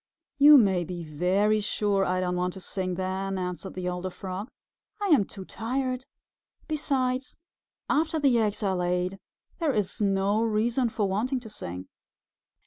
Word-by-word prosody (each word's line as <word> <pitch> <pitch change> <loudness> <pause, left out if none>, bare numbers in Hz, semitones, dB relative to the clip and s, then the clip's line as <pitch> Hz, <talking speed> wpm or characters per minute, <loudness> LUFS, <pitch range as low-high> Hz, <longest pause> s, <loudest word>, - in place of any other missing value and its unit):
"You 295 +1 +10
may 190 -7 +3
be 175 0 -6
very 185 +7 +2
sure 205 -1 +1
I 185 0 0
don't 180 -1 -1
want 180 0 -1
to - - -7
sing 185 -1 -3
then," 190 +1 -2
answered 180 +1 -4
the 185 -1 -3
older 180 +1 -2
Frog. 190 +4 -6 0.5
"I 405 -1 -1
am 280 - +5
too 190 -1 -9
tired. 255 +4 -3 0.6
Besides, 270 -4 -1 0.5
after 315 +2 +1
the 270 -5 +4
eggs 215 -1 0
are 190 -2 +1
laid, 180 +1 -1 0.4
there 325 -4 +2
is 210 -1 -1
no 200 +1 +2
reason 230 +3 +1
for 210 -2 0
wanting 235 +7 0
to 225 - -10
sing." 90 - -7
200 Hz, 155 wpm, -27 LUFS, 185-245 Hz, 0.6 s, You